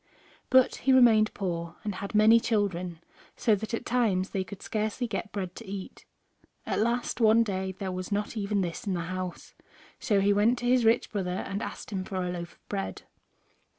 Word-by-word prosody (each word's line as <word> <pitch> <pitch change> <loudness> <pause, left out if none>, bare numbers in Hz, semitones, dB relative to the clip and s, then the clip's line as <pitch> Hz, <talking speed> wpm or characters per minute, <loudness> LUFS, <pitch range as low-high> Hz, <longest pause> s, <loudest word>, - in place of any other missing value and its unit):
But 260 -1 +5
he 270 - +1
remained 225 -4 +6
poor, 170 -3 -3
and 210 - -2
had 200 +3 -6
many 220 +2 +7
children, 185 -7 -1 0.4
so 220 - +3
that 210 +2 -2
at - - -7
times 215 -7 +1
they 190 - -1
could 185 +1 -10
scarcely 215 +3 -2
get 210 -1 -4
bread 185 -3 -4
to 230 - -9
eat. 195 -1 -7 0.6
At - - -1
last, 235 +2 0
one 225 +1 +6
day 190 -3 -3
there 190 0 -4
was 185 +2 -5
not 205 +3 -1
even 205 -1 0
this 180 +5 -4
in 190 - 0
the 170 - -2
house, 185 +1 -5 0.5
so 210 -6 +2
he 200 +1 +3
went 215 +5 +3
to 245 - -5
his 245 -1 +3
rich 230 +2 +3
brother 185 -3 -2
and 200 +2 -4
asked - - -6
him 190 -2 -2
for 190 - -7
a 180 -1 -1
loaf 170 -1 -6
of - - -32
bread. 195 -1 -4
200 Hz, 200 wpm, -28 LUFS, 185-225 Hz, 0.6 s, many